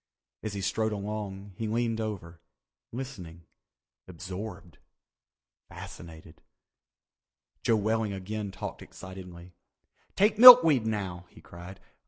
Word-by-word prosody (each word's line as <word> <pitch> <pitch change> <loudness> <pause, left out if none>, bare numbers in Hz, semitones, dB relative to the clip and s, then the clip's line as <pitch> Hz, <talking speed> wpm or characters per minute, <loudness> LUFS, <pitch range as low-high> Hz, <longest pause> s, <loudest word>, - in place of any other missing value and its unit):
As 110 -2 -5
he 100 - -4
strode 110 +3 -1
along, 100 -1 -6
he 110 - -4
leaned 115 0 -2
over, 90 -6 -7 0.5
listening—absorbed, 90 - -11 0.9
fascinated. 80 -2 -12 1.2
Joe 115 - +2
Welling 110 0 -1
again 100 +2 -6
talked - - -8
excitedly. 90 -2 -12 0.6
"Take 210 +2 +2
milkweed 165 - +9
now," 95 -5 -5
he - - -18
cried. 90 +3 -12
100 Hz, 95 wpm, -27 LUFS, 90-110 Hz, 1.2 s, milkweed